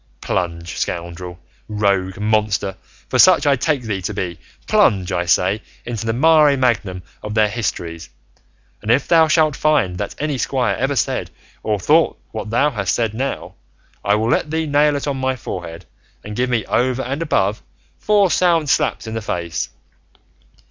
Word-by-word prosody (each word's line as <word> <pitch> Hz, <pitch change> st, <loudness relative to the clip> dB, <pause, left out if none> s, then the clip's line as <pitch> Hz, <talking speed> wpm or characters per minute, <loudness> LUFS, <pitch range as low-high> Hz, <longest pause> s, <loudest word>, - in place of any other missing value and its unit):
Plunge, 85 Hz, -1 st, -3 dB
scoundrel, 85 Hz, +1 st, -4 dB, 0.3 s
rogue, 100 Hz, -3 st, 0 dB
monster 105 Hz, -2 st, 0 dB, 0.3 s
for 130 Hz, -, -1 dB
such 185 Hz, 0 st, +6 dB
I 140 Hz, -1 st, +4 dB
take 140 Hz, 0 st, 0 dB
thee 105 Hz, -4 st, -3 dB
to 105 Hz, +3 st, -4 dB
be 85 Hz, -4 st, -4 dB, 0.3 s
plunge, 95 Hz, -3 st, +2 dB
I 85 Hz, -, 0 dB
say, 95 Hz, +5 st, +2 dB, 0.2 s
into 115 Hz, -2 st, -4 dB
the -, -, +2 dB
mare 150 Hz, +1 st, +5 dB
magnum 105 Hz, -8 st, 0 dB, 0.2 s
of 105 Hz, 0 st, -5 dB
their 110 Hz, -1 st, +4 dB
histories; 85 Hz, -7 st, -4 dB, 0.7 s
and 105 Hz, -, -6 dB
if 130 Hz, +4 st, +3 dB
thou 165 Hz, -2 st, +5 dB
shalt 155 Hz, -2 st, +3 dB
find 125 Hz, -14 st, +1 dB
that 100 Hz, -, -4 dB
any 145 Hz, -3 st, -2 dB
squire 130 Hz, -1 st, 0 dB
ever 135 Hz, +2 st, -1 dB
said 120 Hz, -, -1 dB, 0.3 s
or 105 Hz, -2 st, -1 dB
thought 155 Hz, -, +3 dB
what 110 Hz, -1 st, -5 dB
thou 140 Hz, +7 st, +2 dB
hast 100 Hz, -7 st, -1 dB
said 115 Hz, -3 st, -1 dB
now, 135 Hz, +5 st, -4 dB, 0.5 s
I 100 Hz, +1 st, +3 dB
will 110 Hz, +2 st, 0 dB
let 150 Hz, -, +1 dB
thee 160 Hz, +1 st, -1 dB
nail 145 Hz, 0 st, +3 dB
it 140 Hz, -, -3 dB
on 140 Hz, -2 st, -1 dB
my 130 Hz, 0 st, 0 dB
forehead, 85 Hz, -8 st, -7 dB, 0.4 s
and 105 Hz, 0 st, -7 dB
give 125 Hz, +2 st, 0 dB
me, 120 Hz, -3 st, 0 dB
over 130 Hz, +1 st, 0 dB
and 135 Hz, +5 st, -3 dB
above, 105 Hz, -10 st, 0 dB, 0.4 s
four 205 Hz, -3 st, +3 dB
sound 165 Hz, -5 st, +2 dB
slaps -, -, 0 dB
in 110 Hz, -, -6 dB
the 115 Hz, -, -3 dB
face. 85 Hz, -5 st, -3 dB
115 Hz, 170 wpm, -19 LUFS, 95-140 Hz, 0.7 s, such